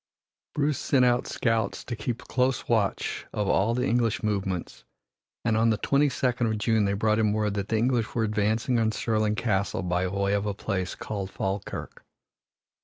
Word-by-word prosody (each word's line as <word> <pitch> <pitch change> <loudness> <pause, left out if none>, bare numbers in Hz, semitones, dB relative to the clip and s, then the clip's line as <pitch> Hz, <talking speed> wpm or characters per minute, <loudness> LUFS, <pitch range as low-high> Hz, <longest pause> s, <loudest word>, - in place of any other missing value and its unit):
Bruce 145 -2 +1
sent 130 -3 +3
out 120 0 +2
scouts 115 -4 -1
to 120 - -4
keep 115 +2 -4
close 130 0 0
watch 110 -4 0
of 105 -1 -1
all 105 +4 +2
the 125 +1 0
English 115 -3 +1
movements, 95 - -2 0.6
and 110 -2 +2
on 115 +1 +3
the 110 - +2
twenty 140 +6 +2
second 125 -2 0
of 110 -1 0
June 110 0 +2
they 100 - +1
brought 110 +2 +1
him 105 -2 +2
word 105 -1 0
that 100 -1 -2
the 110 - +1
English 120 -1 0
were 115 - +2
advancing 110 +3 +1
on 110 -1 +2
Stirling 110 -1 0
Castle 100 -4 0
by 90 +1 0
way 100 +1 0
of 100 +1 0
a 100 - -2
place 95 -3 -3
called 100 -3 -4
Falkirk. 95 +1 -4
110 Hz, 180 wpm, -27 LUFS, 100-120 Hz, 0.6 s, sent